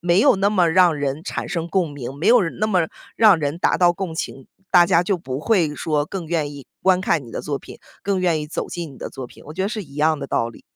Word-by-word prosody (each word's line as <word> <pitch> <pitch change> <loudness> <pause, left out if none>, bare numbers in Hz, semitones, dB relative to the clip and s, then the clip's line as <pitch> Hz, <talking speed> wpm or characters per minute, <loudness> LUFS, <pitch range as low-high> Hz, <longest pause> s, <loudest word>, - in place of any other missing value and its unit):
没 175 +2 +3
有 255 -3 +5
那 200 +1 +2
么 185 -5 +3
让 180 -1 +5
人 145 +1 -3
产 - - -4
生 170 -2 -3
共 175 -3 0
鸣， 135 -2 -6
没 150 +7 -3
有 240 -1 +6 0.2
那 215 - +3
么 180 -6 +2 0.3
让 210 -6 +6
人 145 +2 -2
达 - - +2
到 175 -1 +4
共 180 -2 -5
情， 135 -4 -5 0.2
大 175 -1 +6
家 175 -2 +4
就 185 +1 0
不 130 -5 -5
会 165 -6 +2
说 150 -1 -1
更 185 -2 -6
愿 155 -3 -1
意 140 -3 -11 0.2
观 185 -1 +4
看 170 -7 0
你 115 - -12
的 - - -3
作 145 -2 -3
品， - - -12 0.2
更 195 -2 0
愿 170 -4 +1
意 150 - -5
走 150 - -4
进 170 -4 -6
你 - - -15
的 - - -6
作 130 - -7
品， - - -17
我 155 - -9
觉 190 - -2
得 195 - 0
是 215 -1 -4
一 140 -5 -14
样 155 +1 +2
的 140 - -4
道 115 - 0
理。 115 - -13
170 Hz, 295 characters per minute, -21 LUFS, 145-185 Hz, 0.3 s, 有